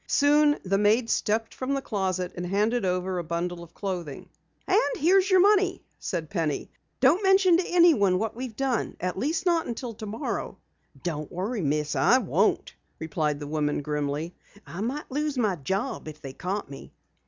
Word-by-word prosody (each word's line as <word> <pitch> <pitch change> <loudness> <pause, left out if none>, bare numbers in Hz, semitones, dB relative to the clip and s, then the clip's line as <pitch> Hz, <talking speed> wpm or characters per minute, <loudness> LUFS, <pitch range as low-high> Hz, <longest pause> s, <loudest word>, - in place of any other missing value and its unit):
Soon 295 +1 +4
the 195 +1 +1
maid 220 +3 +3
stepped 220 +2 0
from 265 +2 -2
the 275 - -2
closet, 185 -3 -2
and 175 - -4
handed 210 +6 +1
over 180 0 -1
a - - -3
bundle 170 +1 -3
of 170 0 -13
clothing. 175 -8 -5 0.4
"And 440 +5 +2
here 365 +5 +5
is 385 +1 0
your 375 -1 +6
money," 390 -2 +3 0.2
said 160 -2 -3
Penny. 160 -7 -2 0.3
"Don't 375 - +5
mention 385 -3 +5
to 360 - -1
anyone 305 - +4
what 220 +3 -2
we've 245 -2 -6
done 265 -2 -1
at 180 0 -2
least 320 - -1
not 340 -2 +2
until 235 0 -5
tomorrow." 215 0 -4 0.5
"Don't 155 -4 -4
worry, 200 +5 -3
Miss, 150 0 0
I 140 - +5
won't," 200 - +1 0.2
replied 155 -2 -2
the 145 - -6
woman 150 -1 -1
grimly. 150 +3 -2 0.3
"I 175 - -7
might 260 +7 -4
lose 295 0 -1
my 215 -6 +1
job 190 - -3
if 155 0 -8
they 135 -3 -8
caught 190 +7 -3
me." 135 - -11
205 Hz, 175 wpm, -26 LUFS, 170-275 Hz, 0.5 s, your